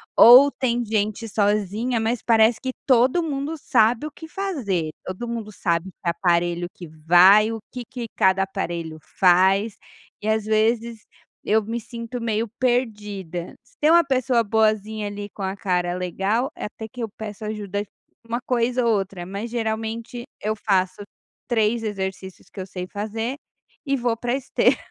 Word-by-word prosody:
ou 255 Hz, +5 st, +9 dB
tem 245 Hz, -3 st, -1 dB
gente 215 Hz, +1 st, -1 dB
sozinha, 210 Hz, +3 st, 0 dB
mas 225 Hz, +1 st, -1 dB
parece 225 Hz, 0 st, +4 dB
que 260 Hz, -, -2 dB
todo 255 Hz, +6 st, +4 dB
mundo 290 Hz, 0 st, -3 dB
sabe 240 Hz, -3 st, +2 dB
o -, -, -9 dB
que 320 Hz, -, -11 dB
fazer, 260 Hz, -, -2 dB
todo 185 Hz, +6 st, -5 dB
mundo 230 Hz, -2 st, -5 dB
sabe 170 Hz, -2 st, -1 dB
que 175 Hz, -, -4 dB
aparelho 175 Hz, 0 st, +1 dB
que 175 Hz, -, -10 dB
vai, 175 Hz, +7 st, +5 dB
o 225 Hz, -, -4 dB
que 250 Hz, -1 st, -6 dB
que 245 Hz, 0 st, -6 dB
cada 190 Hz, 0 st, +4 dB
aparelho 170 Hz, -4 st, -4 dB, 0.2 s
faz, 190 Hz, +4 st, +4 dB, 0.4 s
e 210 Hz, -, -5 dB
às 220 Hz, -1 st, +1 dB
vezes 225 Hz, +1 st, 0 dB, 0.4 s
eu 220 Hz, +1 st, +3 dB
me 225 Hz, +3 st, -4 dB
sinto 235 Hz, +1 st, -7 dB
meio 225 Hz, 0 st, -1 dB
perdida. 210 Hz, -9 st, -2 dB
Se 245 Hz, -, -29 dB
tem 300 Hz, -, +4 dB
uma 340 Hz, +1 st, +7 dB
pessoa 255 Hz, -4 st, +1 dB
boazinha 215 Hz, 0 st, +1 dB
ali, 205 Hz, 0 st, -6 dB
com -, -, -10 dB
a 190 Hz, +1 st, -3 dB
cara 180 Hz, -4 st, 0 dB
legal, 195 Hz, +7 st, -1 dB
eh, -, -, -5 dB
até 220 Hz, +1 st, -7 dB
que 245 Hz, +2 st, -9 dB
eu 225 Hz, -, -3 dB
peço 215 Hz, 0 st, -7 dB
ajuda 205 Hz, -2 st, -3 dB
de 210 Hz, -, -21 dB, 0.4 s
um -, -, +2 dB
coisa 245 Hz, 0 st, +1 dB
ou 230 Hz, -, +4 dB
outra, 195 Hz, -2 st, -5 dB
mas 200 Hz, +5 st, -6 dB
geralmente 225 Hz, +1 st, -3 dB, 0.2 s
eu 215 Hz, +1 st, -1 dB
faço 190 Hz, -2 st, 0 dB, 0.5 s
3 225 Hz, -1 st, +1 dB
exercícios 190 Hz, -3 st, -5 dB
que 195 Hz, -, -8 dB
eu -, -, -5 dB
sei 180 Hz, -1 st, -6 dB
fazer, 220 Hz, +5 st, -4 dB, 0.5 s
e 275 Hz, -1 st, +1 dB
vou 240 Hz, -2 st, 0 dB
para 240 Hz, +1 st, -2 dB
esteira. 270 Hz, -1 st, +2 dB
220 Hz, 165 wpm, -23 LUFS, 195-235 Hz, 0.5 s, ou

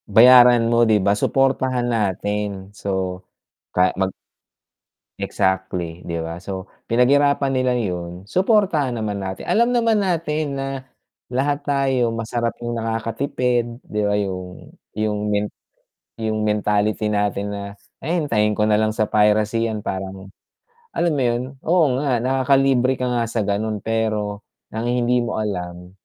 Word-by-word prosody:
Bayaran 120 Hz, -1 st, +7 dB
mo 120 Hz, -1 st, +4 dB
'di 105 Hz, -3 st, +3 dB
ba? 100 Hz, +1 st, +2 dB
suportahan 130 Hz, -2 st, +1 dB
natin. 105 Hz, -2 st, -2 dB
So, 95 Hz, -2 st, -3 dB, 0.6 s
ka 90 Hz, 0 st, +4 dB
mag 95 Hz, 0 st, 0 dB, 1.1 s
exactly, 90 Hz, -3 st, -2 dB
'di 85 Hz, -1 st, -3 dB
ba 85 Hz, +1 st, -5 dB
so, 95 Hz, 0 st, -7 dB, 0.2 s
pinag-hirapan 140 Hz, +4 st, +3 dB
nila 130 Hz, -1 st, +1 dB
yun, 90 Hz, -6 st, -3 dB
suportahan 185 Hz, -, +2 dB
naman 105 Hz, -2 st, -2 dB
natin, 95 Hz, -1 st, -5 dB
alam 235 Hz, +3 st, +3 dB
naman 230 Hz, -2 st, +3 dB
natin 160 Hz, -6 st, -1 dB
na 135 Hz, 0 st, -3 dB, 0.7 s
lahat 145 Hz, +2 st, 0 dB
tayo 135 Hz, -4 st, +1 dB
masarap 115 Hz, +1 st, -2 dB
yung 120 Hz, 0 st, -3 dB
nakakatipid 120 Hz, +1 st, -1 dB
'di 105 Hz, 0 st, -3 dB
ba 105 Hz, -, +1 dB
yung 95 Hz, -3 st, -4 dB, 0.3 s
yung 105 Hz, 0 st, -1 dB, 0.2 s
men 105 Hz, 0 st, 0 dB, 0.7 s
yung 110 Hz, -1 st, -1 dB
mentality 105 Hz, 0 st, +1 dB
natin 105 Hz, -1 st, 0 dB
na 100 Hz, -, -5 dB, 0.4 s
hintayin 140 Hz, -10 st, +1 dB
ko 105 Hz, -, +3 dB
nalang 110 Hz, +1 st, +3 dB
sa 110 Hz, 0 st, 0 dB
piracy 105 Hz, +2 st, +2 dB
yan 110 Hz, -1 st, -3 dB
parang 95 Hz, 0 st, -5 dB, 0.7 s
alam 170 Hz, -, +2 dB
mo 145 Hz, -, -1 dB
yun, 120 Hz, 0 st, 0 dB, 0.2 s
oo 175 Hz, 0 st, +4 dB
nga 130 Hz, -5 st, 0 dB
nakakalibre 130 Hz, 0 st, +3 dB
ka 125 Hz, -1 st, -2 dB
nga 120 Hz, -1 st, 0 dB
sa 115 Hz, -1 st, -1 dB
ganun 105 Hz, +1 st, -2 dB
pero, 110 Hz, -2 st, -2 dB, 0.2 s
ang 110 Hz, +2 st, -3 dB
hindi 125 Hz, 0 st, +2 dB
mo 110 Hz, -, -2 dB
alam, 90 Hz, -3 st, -5 dB
110 Hz, 135 wpm, -21 LUFS, 100-130 Hz, 1.1 s, Bayaran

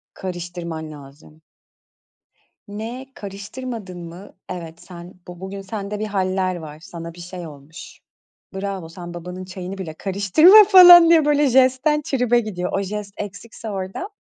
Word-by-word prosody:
Karıştırman 175 Hz, -3 st, -6 dB
lazım. 145 Hz, +2 st, -15 dB, 1.3 s
"Ne, 225 Hz, +6 st, -7 dB
karıştırmadın 200 Hz, 0 st, -8 dB
mı? 175 Hz, +4 st, -11 dB, 0.2 s
Evet, 170 Hz, -2 st, -8 dB
sen 175 Hz, 0 st, -12 dB
bu 175 Hz, -1 st, -10 dB
bugün 190 Hz, +1 st, -7 dB
sende 200 Hz, +1 st, -6 dB
bir 215 Hz, -, -3 dB
hâller 185 Hz, -2 st, -1 dB
var, 155 Hz, -3 st, -9 dB
sana 170 Hz, 0 st, -9 dB
bir 175 Hz, -, -13 dB
şey 175 Hz, 0 st, -8 dB
olmuş. 150 Hz, +2 st, -13 dB, 0.5 s
Bravo, 190 Hz, -3 st, -5 dB
sen 175 Hz, 0 st, -10 dB
babanın 180 Hz, +2 st, -8 dB
çayını 185 Hz, +1 st, -8 dB
bile 165 Hz, -5 st, -6 dB
karıştırma," 205 Hz, -, +6 dB
falan 355 Hz, -4 st, +10 dB
diye 320 Hz, -3 st, +5 dB
böyle 295 Hz, 0 st, +3 dB
jestten 265 Hz, +4 st, +3 dB
tribe 245 Hz, -3 st, +1 dB
gidiyor. 185 Hz, -5 st, -5 dB
O 195 Hz, -, 0 dB
jest 200 Hz, +1 st, -6 dB
eksikse 215 Hz, +2 st, -8 dB
orada, 195 Hz, -, -5 dB
190 Hz, 140 wpm, -21 LUFS, 175-225 Hz, 1.3 s, falan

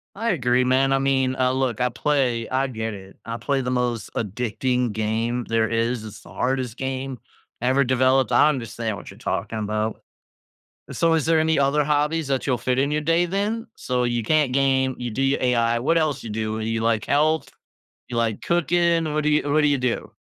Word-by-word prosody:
I 230 Hz, +3 st, -1 dB
agree, 125 Hz, -, +2 dB
man. 130 Hz, +1 st, +2 dB
I 135 Hz, -, +3 dB
mean, 135 Hz, -1 st, +1 dB
uh, 130 Hz, -1 st, +2 dB
look 130 Hz, -3 st, -1 dB
I 125 Hz, -, +3 dB
play 125 Hz, -3 st, 0 dB
I 130 Hz, +1 st, +1 dB
get 110 Hz, -3 st, -4 dB
it, 95 Hz, -1 st, -11 dB
I 115 Hz, 0 st, -5 dB
play 140 Hz, 0 st, -1 dB
the 125 Hz, -, -2 dB
most 125 Hz, -3 st, -1 dB
addicting 125 Hz, +3 st, -1 dB
game 115 Hz, +3 st, -1 dB
there 115 Hz, -1 st, +2 dB
is, 115 Hz, +1 st, -1 dB
it's 105 Hz, -2 st, -9 dB
the -, -, -16 dB
hardest 130 Hz, -2 st, -2 dB
game 130 Hz, -1 st, -4 dB, 0.4 s
ever 130 Hz, +2 st, +3 dB
developed, 130 Hz, 0 st, +2 dB
I 125 Hz, +5 st, +5 dB
understand 115 Hz, -5 st, -3 dB
what -, -, -10 dB
you're -, -, -14 dB
talking 110 Hz, -, -3 dB
about. 110 Hz, +1 st, -2 dB, 0.9 s
Uh, -, -, -5 dB
so 165 Hz, -1 st, +2 dB
is 160 Hz, -3 st, +1 dB
there 160 Hz, 0 st, +3 dB
any 160 Hz, -1 st, +2 dB
other 140 Hz, +2 st, +3 dB
hobbies 150 Hz, +2 st, 0 dB
that 135 Hz, -1 st, -1 dB
you'll 125 Hz, -3 st, +1 dB
fit 125 Hz, +2 st, -1 dB
in 140 Hz, +2 st, +1 dB
your 150 Hz, 0 st, 0 dB
day 165 Hz, +3 st, +2 dB
then? 205 Hz, +6 st, -2 dB
So 125 Hz, -1 st, -1 dB
you 120 Hz, -1 st, 0 dB
can't 150 Hz, +2 st, +2 dB
game, 130 Hz, -1 st, +2 dB
you 125 Hz, -1 st, -4 dB
do 130 Hz, +5 st, -2 dB
your 135 Hz, +1 st, +2 dB
AI, 120 Hz, -2 st, +2 dB
what 145 Hz, +8 st, +1 dB
else 150 Hz, -5 st, 0 dB
you -, -, -7 dB
do? 110 Hz, 0 st, -2 dB
Well 110 Hz, -, -4 dB
you 115 Hz, 0 st, -2 dB
like 115 Hz, -2 st, +1 dB
health? 155 Hz, +2 st, +1 dB, 0.6 s
You 120 Hz, -, -5 dB
like 115 Hz, -2 st, 0 dB
cooking, 170 Hz, -1 st, +1 dB
what 150 Hz, 0 st, -1 dB
do -, -, +2 dB
you 150 Hz, -1 st, +1 dB
what 155 Hz, -, +4 dB
do 150 Hz, -, +4 dB
you 140 Hz, -1 st, +2 dB
do? 125 Hz, -2 st, -2 dB
130 Hz, 215 wpm, -23 LUFS, 115-145 Hz, 0.9 s, I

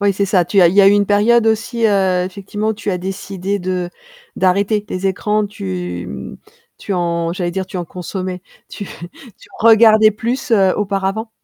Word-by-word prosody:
Oui, 200 Hz, -1 st, +2 dB
c'est 200 Hz, -, 0 dB
ça. 185 Hz, -3 st, +1 dB
Tu 195 Hz, -1 st, +3 dB
as 175 Hz, -, +6 dB
il 175 Hz, -, -1 dB
y 205 Hz, -, +6 dB
a 195 Hz, -, +6 dB
eu -, -, +5 dB
une 205 Hz, 0 st, +3 dB
période 220 Hz, +3 st, +3 dB
aussi, 225 Hz, +1 st, 0 dB
heu, 190 Hz, -3 st, +2 dB
effectivement, 205 Hz, +3 st, -4 dB
tu 210 Hz, -1 st, -4 dB
as 185 Hz, -, -1 dB
décidé 190 Hz, +1 st, -4 dB
de 180 Hz, -1 st, -3 dB, 0.4 s
d'arrêter 200 Hz, +3 st, +1 dB
les 185 Hz, +1 st, -3 dB
écrans, 210 Hz, +2 st, 0 dB
tu 90 Hz, -, -5 dB, 0.7 s
tu 200 Hz, -, -4 dB
en 170 Hz, -1 st, -1 dB
j'allais 175 Hz, -2 st, -2 dB
dire 190 Hz, +1 st, -4 dB
tu 190 Hz, -, -8 dB
en 175 Hz, -, -3 dB
consommais. 185 Hz, +1 st, -6 dB, 0.3 s
Tu 205 Hz, -, -7 dB
tu 175 Hz, +7 st, -13 dB
regardais 220 Hz, -1 st, +6 dB
plus, 235 Hz, +4 st, -3 dB
heu, 195 Hz, -3 st, +4 dB
auparavant? 200 Hz, +2 st, -2 dB
195 Hz, 185 wpm, -17 LUFS, 180-210 Hz, 0.7 s, as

